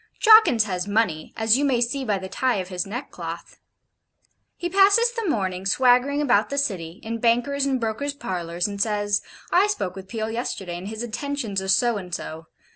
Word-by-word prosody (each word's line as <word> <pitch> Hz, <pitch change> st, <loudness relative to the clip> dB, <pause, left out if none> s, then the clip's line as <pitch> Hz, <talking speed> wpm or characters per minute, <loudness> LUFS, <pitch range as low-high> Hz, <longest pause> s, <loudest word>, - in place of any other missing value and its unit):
Jawkins 435 Hz, -, +7 dB
has 185 Hz, -2 st, -3 dB
money, 200 Hz, -7 st, 0 dB
as 225 Hz, +3 st, +3 dB
you -, -, 0 dB
may 265 Hz, -4 st, +2 dB
see 245 Hz, +3 st, -1 dB
by 210 Hz, -5 st, 0 dB
the 190 Hz, 0 st, -6 dB
tie 255 Hz, +6 st, 0 dB
of 185 Hz, -2 st, -4 dB
his 180 Hz, 0 st, -3 dB
neckcloth. 240 Hz, +7 st, -7 dB, 1.0 s
He 350 Hz, -, -3 dB
passes 400 Hz, +6 st, +4 dB
the 460 Hz, -6 st, -3 dB
morning 190 Hz, -7 st, -1 dB
swaggering 255 Hz, +7 st, +3 dB
about 230 Hz, -7 st, +2 dB
the 280 Hz, -, -3 dB
City, 185 Hz, -11 st, -2 dB
in 230 Hz, +1 st, -4 dB
bankers' 245 Hz, +5 st, +1 dB
and 265 Hz, -2 st, 0 dB
brokers 240 Hz, +6 st, -3 dB
parlours, 175 Hz, -, -3 dB
and 200 Hz, -1 st, -5 dB
says: 205 Hz, -1 st, 0 dB, 0.3 s
'I 375 Hz, +4 st, +4 dB
spoke 190 Hz, -, -3 dB
with 190 Hz, -1 st, -9 dB
Peel 220 Hz, -1 st, -3 dB
yesterday, 190 Hz, -7 st, -4 dB
and 185 Hz, -, -8 dB
his 220 Hz, +2 st, -5 dB
intentions 240 Hz, -4 st, -3 dB
are 190 Hz, -, -6 dB
so 235 Hz, +3 st, +3 dB
and 180 Hz, -3 st, -5 dB
so. 160 Hz, +1 st, -8 dB
225 Hz, 190 wpm, -23 LUFS, 190-275 Hz, 1.0 s, Jawkins